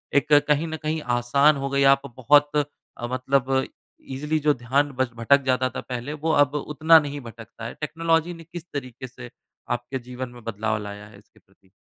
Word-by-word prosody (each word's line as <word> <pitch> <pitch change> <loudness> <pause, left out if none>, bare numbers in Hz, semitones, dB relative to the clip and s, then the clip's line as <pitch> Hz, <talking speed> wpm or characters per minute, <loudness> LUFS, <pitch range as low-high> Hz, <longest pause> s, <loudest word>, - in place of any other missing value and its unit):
एक 145 +1 +3
कहीं 150 +2 +2
न 160 0 -4
कहीं 155 +1 -1 0.2
आसान 140 +5 +3
हो 140 0 -3
गई। 140 0 +2
आप 140 - -2 0.2
बहुत 145 +3 +5 0.5
अ, 120 - -4
मतलब 130 +1 +1 0.5
ईज़िली 150 +4 -1
जो 150 0 +3
ध्यान 135 +4 0
बस 130 - +2
भटक 130 +5 +3
जाता 130 0 +2
था 125 - -6
पहले, 125 +3 -5
वो 155 +2 -1
अब 145 +1 -5
उतना 155 +3 +4
नहीं 145 -1 -5
भटकता 115 -1 -11
है। 115 - -5
टेक्नोलॉजी 165 +2 0
ने 165 -1 -11
किस 170 +1 -9
तरीके 130 -2 -6
से 120 0 -11 0.4
आपके 120 +2 -3
जीवन 125 +1 -7
में 120 -1 -14
बदलाव 110 0 -2
लाया 105 0 -8
है 105 - -16
इसके 100 - -23
प्रति? 95 -1 -31
135 Hz, 195 wpm, -24 LUFS, 120-150 Hz, 0.5 s, बहुत